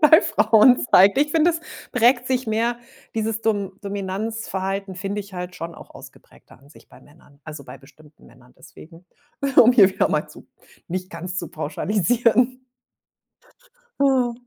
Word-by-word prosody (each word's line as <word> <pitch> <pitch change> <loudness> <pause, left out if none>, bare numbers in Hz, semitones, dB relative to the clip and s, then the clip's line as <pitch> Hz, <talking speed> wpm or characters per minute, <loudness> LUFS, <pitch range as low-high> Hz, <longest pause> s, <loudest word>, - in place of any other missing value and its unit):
bei 315 +2 +7
Frauen 240 - +4
zeigt. 195 +5 +6
Ich 295 +2 +1
finde, 325 +1 +3
es 330 -1 -5 0.3
prägt 245 +1 +3
sich 255 -1 -1
mehr 230 +2 -1 0.4
dieses 220 0 -2
Dom 205 -4 -1
Dominanzverhalten 195 -1 -4
finde 195 +2 -4
ich 200 0 -13
halt 180 0 -7
schon 165 0 -7
auch - - -14
ausgeprägter - - -17
an 135 +3 -22
sich 145 - -20
bei 125 - -18
Männern. 145 0 -23
Also, 150 -2 -9
bei 135 - -12
bestimmten 150 +2 -21
Männern, 125 0 -21
deswegen, 165 +2 -16 0.5
um 240 +2 +7
hier 205 -6 +6
wieder 190 - 0
mal - - -2
zu - - -15 0.4
nicht 185 +1 -5
ganz 180 +2 -6
zu 170 - -5
pauschalisieren. 230 - 0 1.4
Oh, 260 -3 +2
200 Hz, 155 wpm, -21 LUFS, 170-240 Hz, 1.4 s, bei